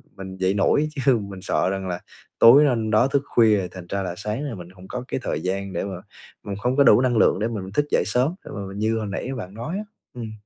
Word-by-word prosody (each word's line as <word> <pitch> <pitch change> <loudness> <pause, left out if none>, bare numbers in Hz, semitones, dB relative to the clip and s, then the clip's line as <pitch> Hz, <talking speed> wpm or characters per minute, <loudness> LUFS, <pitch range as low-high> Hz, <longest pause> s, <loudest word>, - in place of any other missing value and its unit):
mình 95 -1 -8
dậy 95 0 +1
nổi, 125 +9 +2
chứ 135 -4 +2
mình 100 -3 -7
sợ 90 - 0
rằng 95 0 -3
là 90 -1 -3 0.4
tối 135 +6 +8
hôm 115 -6 0
đó 110 +4 +4
thức 135 0 0
khuya 110 -5 +4
rồi 95 -2 -2
thành 95 -2 -9
ra 100 - -1
là 90 -2 -3
sáng 105 +7 -3
là 140 -6 -4
mình 90 -2 -10
hông 90 0 -14
có 125 +3 -5
cái - - -3
thời 75 - -2
gian 95 +2 -3
để 85 - -2
mà 100 -1 -5 0.5
mình 100 - -5
hông 125 +5 0
có 140 - +6
đủ 125 - +6
năng 125 -2 +1
lượng - - +4
để 110 - 0
mình 100 -5 -5
thức 145 - +1
dậy - - +3
sớm, 125 +9 +1
để - - -9
mà 100 - -4
mình 95 +1 -8
như 110 +1 +1
hồi 110 -1 -3
nãy 100 +5 -4
bạn 95 -4 -7
nói 120 - -5
á, 210 - -4 0.3
ừm. 115 -3 -6
105 Hz, 275 wpm, -23 LUFS, 95-125 Hz, 0.5 s, tối